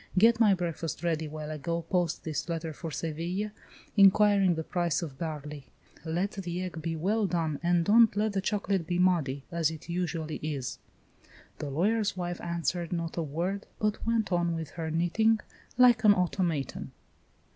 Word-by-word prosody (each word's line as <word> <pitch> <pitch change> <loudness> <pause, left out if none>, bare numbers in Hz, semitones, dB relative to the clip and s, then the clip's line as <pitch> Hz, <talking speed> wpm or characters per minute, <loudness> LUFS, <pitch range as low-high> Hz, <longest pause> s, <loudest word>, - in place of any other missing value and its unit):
Get 230 +4 +6
my 210 -4 +5
breakfast 170 -2 -4
ready 160 -2 0
while 155 0 -6
I 155 - -4
go 170 +3 -2
post 175 0 -1
this 160 +1 -3
letter 165 -1 -3
for 165 +2 -6
Seville, 170 +7 -3 0.4
inquiring 200 -2 +5
the 160 - -3
price 175 0 0
of 140 -5 -7
barley. 150 -4 -5 0.4
Let 175 +5 -1
the 180 -2 -4
egg 175 -3 -5
be 165 +1 -2
well 200 +6 +1
done 160 -5 -1
and 175 -1 +2
don't 225 +1 +6
let 210 0 +1
the 195 - 0
chocolate 195 -3 -1
be 175 - 0
muddy, 160 -7 +2
as 170 -2 +1
it 160 +1 -9
usually 165 -3 -2
is." 145 -4 -4 0.8
The 145 - -4
lawyer's 205 +7 +1
wife 175 0 -3
answered 170 0 -2
not 170 -2 -3
a 170 - -1
word, 170 +6 -3
but 210 -1 -1
went 225 -3 0
on 175 -1 +1
with 160 -2 -5
her 165 -2 -4
knitting, 195 +8 +2 0.4
like 245 -3 +6
an 205 -1 +7
automaton. 175 -5 -1
175 Hz, 170 wpm, -29 LUFS, 160-195 Hz, 0.8 s, an